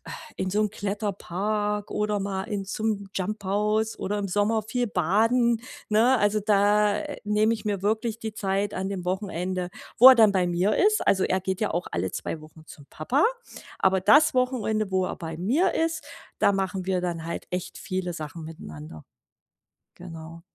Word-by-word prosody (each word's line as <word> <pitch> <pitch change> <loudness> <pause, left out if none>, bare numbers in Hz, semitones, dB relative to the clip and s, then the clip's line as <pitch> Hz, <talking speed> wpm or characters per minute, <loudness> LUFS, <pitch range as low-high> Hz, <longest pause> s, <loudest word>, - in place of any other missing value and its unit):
äh, - - -9 0.3
in 190 - -2
so 210 +3 +1
'n 210 - +2
Kletterpark 205 0 -2
oder 210 -1 -1
mal 195 -1 -2
in 200 -3 -3
zum 210 -1 -2
JUMP 210 +2 -3
House 210 +3 0
oder 205 +2 -2
im 200 -1 -3
Sommer 205 +4 +1
viel 245 +3 -2
baden, 225 +6 +2 0.3
ne? 230 +4 +4
Also, 205 +1 +2
da, 205 0 +3
äh, - - -5
nehme 210 +2 +2
ich 215 - -9
mir 200 -3 -1
wirklich 220 +2 -1
die 220 -2 -6
Zeit 200 -1 -1
an 190 +1 -3
dem 180 -2 -5
Wochenende, 185 -1 -2 0.3
wo 260 +3 +11
er - - +8
dann 220 -4 +5
bei 185 -2 +2
mir 175 +4 +1
ist. 425 +2 +3
Also, 190 - +3
er 185 0 +1
geht 190 +2 -3
ja - - 0
auch 175 +2 -2
alle 85 +2 -1
2 155 - -5
Wochen 155 0 -15
zum 145 - -13
Papa. 255 - +1 0.5
Aber 190 -1 +2
das 295 +6 +5
Wochenende, 220 -5 0
wo 185 -1 +1
er - - -4
bei 160 -1 -6
mir 260 - +2
ist, 320 -2 -1 0.3
da 200 - +4
machen 190 -1 -2
wir 185 -1 0
dann 170 -2 -3
halt 170 - -5
echt 180 0 -5
viele 185 -1 -3
Sachen 160 0 -7
miteinander. 80 - -10 0.9
Genau. 165 -1 -10
200 Hz, 185 wpm, -26 LUFS, 180-215 Hz, 0.9 s, wo